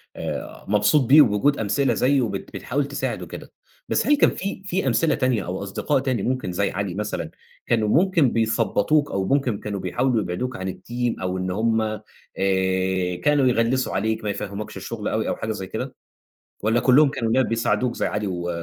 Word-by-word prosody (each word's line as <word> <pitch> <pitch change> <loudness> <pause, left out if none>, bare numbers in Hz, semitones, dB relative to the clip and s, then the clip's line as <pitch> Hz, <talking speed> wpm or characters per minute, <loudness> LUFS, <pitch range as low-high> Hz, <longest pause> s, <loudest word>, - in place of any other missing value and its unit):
آآ، - - -6
مبسوط 105 +7 +3
بيه 145 +6 +8
وبوجود 135 +3 +3
أمثلة 125 +6 +1
زيّه 135 +1 +2
وبت 100 -5 -4
بتحاول 140 +2 -2
تساعد 140 - -3
وكده، - - -9 0.4
بس - - +1
هل 295 - +5
كان - - +5
في 195 0 -5
في 190 -5 -1
أمثلة 130 +6 +2
تانية 130 - 0
أو 95 +2 -4
أصدقاء 115 +8 0
تاني 130 -6 -1
ممكن 130 -7 -1
زي 100 +3 0
علي 95 -1 -3
مثلًا 90 -6 -3 0.4
كانوا 110 -3 +2
ممكن 165 - +3
بيثبطوك 115 +5 +1
أو 95 -1 -1
ممكن 130 -3 +1
كانوا 100 -2 -4
بيحاولوا 120 +6 0
يبعدوك 100 +8 -3
عن 95 0 -4
الteam 120 0 -3
أو 95 0 -2
إن 95 0 -2
هُم 110 +3 +1
آآ، 110 -1 -3 1.2
كانوا 145 -3 +3
يغلّسوا 125 +2 +1
عليك، 110 +3 -1
ما 105 - -2
يفهموكش 100 +1 -5
الشغل 110 -3 -5
أوي 110 0 -1
أو - - -1
حاجة 110 - -4
زي 95 -3 -5
كده؟ 125 +7 -5 0.7
والّا 115 +2 +3
كلهم 135 +4 +5
كانوا 115 -4 -2
لا 130 +3 +4
بيساعدوك 120 +1 0
زي - - -1
علي 105 0 -2
و 90 -2 -3
115 Hz, 185 wpm, -23 LUFS, 100-130 Hz, 1.2 s, بيه